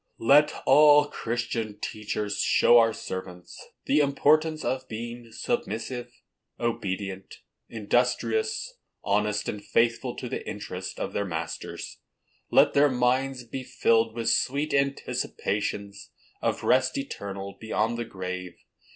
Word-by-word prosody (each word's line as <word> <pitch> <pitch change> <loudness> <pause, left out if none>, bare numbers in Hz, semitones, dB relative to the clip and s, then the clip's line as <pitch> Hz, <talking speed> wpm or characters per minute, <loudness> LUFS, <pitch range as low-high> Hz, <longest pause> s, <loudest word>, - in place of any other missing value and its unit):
Let 145 +6 +5
all 150 +1 +7
Christian 115 -5 -3
teachers 105 -1 -3
show 120 - +5
our 115 -1 +4
servants 90 -3 -7 0.2
the 145 - +3
importance 155 +2 +2
of 130 0 -2
being 115 +1 -7
submissive, 125 - -3 0.5
obedient, 100 -5 -3 0.3
industrious, 430 - 0 0.2
honest 105 +1 0
and 105 -1 -4
faithful 115 +2 +1
to - - -6
the - - -4
interests - - -6
of - - -4
their 100 - 0
masters. 85 -3 -5 0.5
Let - - +5
their 145 +1 +5
minds 130 +1 +1
be 130 +2 -6
filled 115 -2 +2
with 115 -1 0
sweet 145 +4 +1
anticipations 105 -7 -2 0.3
of - - -1
rest 130 0 +3
eternal 100 -7 -5
beyond 110 +1 -1
the 120 - -2
grave. 90 -4 -6
115 Hz, 115 wpm, -27 LUFS, 105-135 Hz, 0.5 s, all